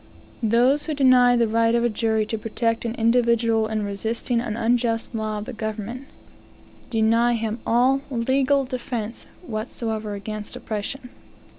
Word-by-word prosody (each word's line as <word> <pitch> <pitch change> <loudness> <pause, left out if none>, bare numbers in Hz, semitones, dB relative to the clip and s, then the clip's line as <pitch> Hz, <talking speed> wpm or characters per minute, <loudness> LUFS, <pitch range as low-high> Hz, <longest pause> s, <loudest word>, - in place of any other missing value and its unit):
Those 250 +7 +3
who 310 - -1
deny 255 -3 +5
the 235 -1 +3
right 230 +1 +2
of 235 - +2
a - - +4
jury 220 -1 0
to 225 - -3
protect 230 +1 -1
an 230 0 -2
individual 230 -1 +2
in 215 -1 -2
resisting 225 +4 -2
an 225 -2 -4
unjust 235 0 0
law 215 -1 -2
of 210 - -5
the 260 - -7
government, 220 +4 -5 0.8
deny 230 +1 +3
him 225 0 -2
all 255 +4 +3 0.2
defence 255 -2 -1 0.2
whatsoever 220 -4 -4
against 210 +1 -5
oppression. 245 +5 -5
230 Hz, 140 wpm, -23 LUFS, 220-245 Hz, 0.8 s, deny